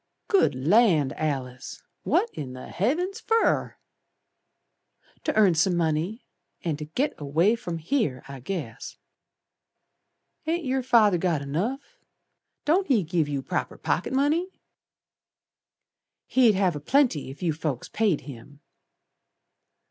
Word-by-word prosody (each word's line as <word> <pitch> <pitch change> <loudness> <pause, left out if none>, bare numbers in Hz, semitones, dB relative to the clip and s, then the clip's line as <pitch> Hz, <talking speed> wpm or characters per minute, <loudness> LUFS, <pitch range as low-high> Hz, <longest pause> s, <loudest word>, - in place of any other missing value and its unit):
"Good 395 - +3
Land, 160 - +3
Alice, 130 -5 -4 0.2
What 445 +6 +1
in 130 -4 -6
the 130 - -9
Heavens 355 - -1
fer!" 455 0 +1 1.5
"To - - 0
earn 205 -5 +5
some 175 +2 +2
money, 165 +7 -1 0.4
And 155 -4 -2
to 150 - -5
git 250 - -1
away 160 +8 +2
from 175 -7 -5
here, 165 - -1
I 135 -1 -8
guess." 135 - -6 1.5
"Ain't 335 0 -1
yer 265 0 0
Father 220 -7 +4
got 165 -5 0
enough? 225 - -3 0.7
Don't 365 +6 +2
he 240 -9 +3
give 160 -2 0
yer 140 -2 -2
proper - - -3
pocket - - -1
money?" 295 +7 +2 1.8
"He'd 240 -5 +4
have 190 -4 +1
a - - -4
plenty, 235 - +2
if 135 +6 -9
you 165 -3 +1
folks 150 -5 -3
paid 210 -8 +1
him." 140 +1 -12
180 Hz, 125 wpm, -26 LUFS, -, 1.8 s, earn